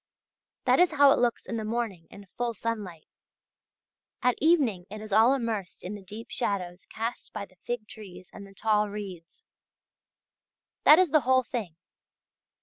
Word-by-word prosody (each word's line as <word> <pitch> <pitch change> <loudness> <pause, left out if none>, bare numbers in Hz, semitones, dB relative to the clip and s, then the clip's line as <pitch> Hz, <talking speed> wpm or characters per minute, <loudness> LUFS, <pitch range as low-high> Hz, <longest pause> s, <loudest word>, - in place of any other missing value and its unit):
That - - +4
is 355 -2 +4
how 285 -1 +6
it - - +3
looks 240 -1 0
in 230 - -4
the 220 - -3
morning 215 -6 -3
in 200 - -13
full 240 -1 -2
sunlight; 205 -7 -5 1.2
at 250 - +4
evening 265 - +2
it 215 +2 -7
is 215 -1 -7
all 225 +5 +6
immersed 225 -8 -4
in 185 - -5
the 205 - -8
deep 210 +4 -10
shadows 185 -5 -3
cast 230 +2 -5
by 205 -1 -5
the 185 - -27
fig 240 -3 -3
trees 190 -4 -11
and 200 -1 -10
the 195 - -17
tall 210 0 +1
reeds. 190 -5 -9 1.4
That 305 - +9
is 365 -4 +3
the 310 - +6
whole 260 +1 +3
thing. 230 -9 -5
215 Hz, 165 wpm, -28 LUFS, 195-245 Hz, 1.4 s, That